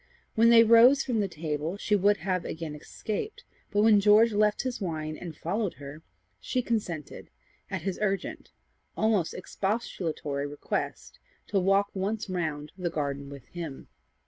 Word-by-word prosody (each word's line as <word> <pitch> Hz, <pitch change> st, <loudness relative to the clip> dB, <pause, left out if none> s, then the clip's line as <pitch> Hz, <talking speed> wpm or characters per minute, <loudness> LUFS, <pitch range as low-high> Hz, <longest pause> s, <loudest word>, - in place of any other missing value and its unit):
When 230 Hz, +1 st, +5 dB
they 230 Hz, -1 st, +8 dB
rose 235 Hz, +5 st, +7 dB
from 240 Hz, -4 st, -1 dB
the 200 Hz, -, +1 dB
table, 155 Hz, +1 st, -3 dB
she 210 Hz, +1 st, +1 dB
would 205 Hz, +1 st, +3 dB
have 185 Hz, +1 st, -1 dB
again 160 Hz, -2 st, -5 dB
escaped, 220 Hz, -, -5 dB, 0.3 s
but 205 Hz, 0 st, +2 dB
when 215 Hz, -2 st, +6 dB
George 215 Hz, +2 st, +5 dB
left 210 Hz, 0 st, +2 dB
his 255 Hz, -4 st, -3 dB
wine 155 Hz, -4 st, -3 dB
and 165 Hz, -2 st, -8 dB
followed 200 Hz, +3 st, -2 dB
her, 145 Hz, +2 st, -9 dB, 0.4 s
she 250 Hz, -, -1 dB
consented, 185 Hz, -, -3 dB, 0.4 s
at -, -, -4 dB
his 195 Hz, -2 st, -3 dB
urgent, 195 Hz, -3 st, -2 dB, 0.5 s
almost 215 Hz, -6 st, +1 dB
expostulatory 175 Hz, -8 st, -3 dB
request, 145 Hz, 0 st, -4 dB, 0.3 s
to 200 Hz, -, +2 dB
walk 195 Hz, +2 st, +3 dB
once 200 Hz, +1 st, -2 dB
round 155 Hz, -4 st, -3 dB
the 180 Hz, -2 st, -2 dB
garden 140 Hz, -3 st, -3 dB
with 140 Hz, -3 st, -10 dB
him. 165 Hz, -6 st, -7 dB
190 Hz, 150 wpm, -28 LUFS, 155-215 Hz, 0.5 s, they